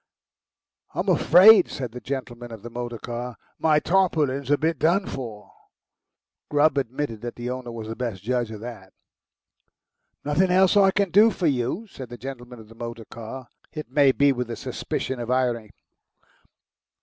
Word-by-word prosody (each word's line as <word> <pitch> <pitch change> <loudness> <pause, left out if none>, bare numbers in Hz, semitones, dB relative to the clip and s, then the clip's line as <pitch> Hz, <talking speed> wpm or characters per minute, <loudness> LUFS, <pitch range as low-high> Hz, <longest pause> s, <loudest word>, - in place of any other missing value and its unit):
"I'm - - -1
afraid," 195 +1 +7
said 125 -4 -5
the 125 +1 -9
gentleman 120 -3 -6
of 110 -3 -10
the 120 - -8
motor 120 0 -5
car, 120 +2 -6 0.2
"my 155 -1 +3
tarpaulin's 150 -6 +1
a 145 - +4
bit 160 +2 -1
done 175 +5 +2
for." 115 -6 -7 1.0
Grubb 145 -1 +3
admitted 130 -3 -4
that 120 0 -6
the 120 +1 -4
owner 125 -1 -6
was 115 -2 -7
the 110 - -5
best 115 -6 -4
judge 120 0 -1
of 110 -1 -8
that. 110 -5 -9 1.3
"Nothin, 165 +6 +2
else 185 +2 +4
I 195 -1 +6
can 195 -1 0
do 210 +5 +7
for 185 -4 -3
you?" 135 - 0
said 135 - -10
the 120 - -8
gentleman 125 -1 -8
of 110 - -13
the 115 - -15
motor 115 -1 -7
car, 120 +3 -9 0.2
it 155 -1 -7
may 140 -3 +5
be 140 +1 +3
with 125 -2 -3
a 115 - -3
suspicion 130 -1 -4
of 120 0 -5
irony. 120 -4 0
125 Hz, 170 wpm, -24 LUFS, 120-155 Hz, 1.3 s, afraid